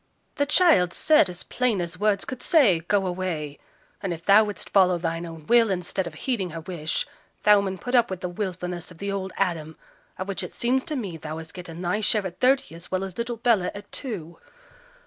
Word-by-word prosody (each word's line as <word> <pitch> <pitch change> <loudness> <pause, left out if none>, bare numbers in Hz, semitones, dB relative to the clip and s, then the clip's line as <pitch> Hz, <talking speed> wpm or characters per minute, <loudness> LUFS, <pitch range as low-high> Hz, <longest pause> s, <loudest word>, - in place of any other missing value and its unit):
'The 285 -1 +1
child 295 - +4
said, 305 -11 +5
as 175 -1 -6
plain 250 -6 0
as 170 -1 -4
words 210 -2 +1
could 260 - -6
say, 255 - +4
"go 195 +4 0
away," 175 -6 -3 0.4
and 195 - -2
if 165 -1 -6
thou 205 +2 +7
wouldst 205 -1 -6
follow 185 -3 +5
thine 165 0 -3
own 165 -2 -10
will 235 +1 +5
instead 185 0 -2
of 160 - -8
heeding 200 -1 -2
her 165 0 -6
wish, 160 -2 -2 0.4
thou 210 -1 +6
mun 190 -1 -3
put 245 +7 -6
up 240 -2 +4
with 190 -2 -4
the 180 - -2
wilfulness 180 -2 -4
of 180 - -13
the 200 +3 -3
old 190 -1 -3
Adam, 165 -5 -1 0.4
of 185 - -4
which 200 -2 -2
it - - -7
seems 255 +2 +1
to 310 -3 -4
me 200 - -4
thee 155 - -9
hast 160 +1 -6
getten 175 -1 -8
thy 180 +5 0
share 210 -1 +2
at 180 -1 -6
thirty 260 -7 +2
as 170 +1 -11
well 185 0 -1
as 190 0 -7
little 235 0 -2
Bella 225 -5 +2
at 205 0 -10
two.' 175 - -5
190 Hz, 220 wpm, -25 LUFS, 170-215 Hz, 0.4 s, thou